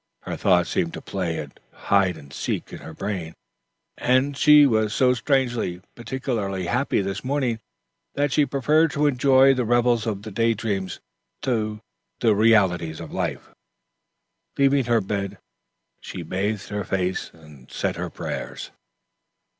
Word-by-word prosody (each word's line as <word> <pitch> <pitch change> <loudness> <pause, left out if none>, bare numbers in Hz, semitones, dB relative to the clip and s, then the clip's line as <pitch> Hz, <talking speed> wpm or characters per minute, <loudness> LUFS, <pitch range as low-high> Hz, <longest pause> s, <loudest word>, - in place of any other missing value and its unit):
Her - - -4
thoughts 90 -3 +2
seemed 175 -2 -1
to - - -5
play 85 -4 -3
at 70 -2 -8
hide 95 -4 +1
and 70 -2 -14
seek - - -3
in - - -7
her - - -9
brain, 95 -5 -4 0.6
and 130 +3 +2
she 150 0 +7
was 110 -4 +1
so 125 -1 +4
strangely, 120 -9 0
peculiarly 115 -7 -3
happy - - +1
this 100 0 -4
morning, 130 -4 -1 0.6
that 145 -1 +1
she 145 0 +3
preferred 155 +4 +2
to 150 +1 +1
enjoy 135 0 +5
the 125 -1 0
revels 120 -1 +2
of 100 -2 -3
day 115 +2 +2
dreams 100 -4 -3 0.4
to 110 -4 -1 0.4
the 115 -3 +4
realities 95 -7 +3
of - - -8
life. - - -3 1.1
Leaving 140 -1 +3
her 120 -2 +2
bed, 100 0 -3 0.6
she 90 - -7
bathed 100 +5 -2
her 105 0 -3
face 95 -1 -2
and 75 -5 -16
said - - -2
her - - -4
prayers. - - -6
110 Hz, 145 wpm, -24 LUFS, 95-130 Hz, 1.1 s, she